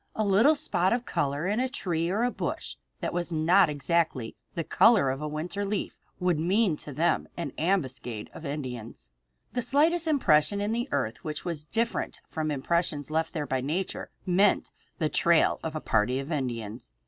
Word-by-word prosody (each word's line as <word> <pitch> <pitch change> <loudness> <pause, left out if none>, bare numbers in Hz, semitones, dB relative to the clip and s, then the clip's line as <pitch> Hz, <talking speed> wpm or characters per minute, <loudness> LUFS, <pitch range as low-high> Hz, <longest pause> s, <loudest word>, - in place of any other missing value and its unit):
A 215 - 0
little 215 +10 +5
spot 190 - +1
of 245 0 -1
color 145 +3 -1
in 205 +4 +1
a 260 +1 +1
tree 170 - -1
or 220 +6 +1
bush - - -4 0.3
that - - -2
was 175 0 -2
not 170 +3 +4
exactly 145 -4 0 0.2
the 165 - -1
color 190 - +5
of 135 +2 -4
a 150 - -2
winter 165 +7 -3
leaf 200 0 -2 0.2
would 180 -4 +1
mean 185 +2 +2
to 145 - -6
them 165 +5 +1
an 170 - -3
ambuscade 130 - -1
of - - -10
Indians. 125 - -6 0.4
The 245 - -1
slightest 310 +7 +3
impression 200 - +3
in 205 +1 -1
the 240 +3 -1
earth 110 - -2
which 155 +1 -5
was 165 -4 -3
different 230 +7 -2
from 155 -1 -3
impressions 150 +1 -1
left 160 +1 0
there 150 -2 -1
by 130 -2 -1
nature 165 +8 -3 0.2
meant 190 +2 +3 0.3
the 160 - +1
trail 170 +1 +3
of 160 -1 -4
a - - -1
party 115 0 +1
of 135 +4 -4
Indians. 115 - -4
165 Hz, 180 wpm, -28 LUFS, 145-200 Hz, 0.4 s, little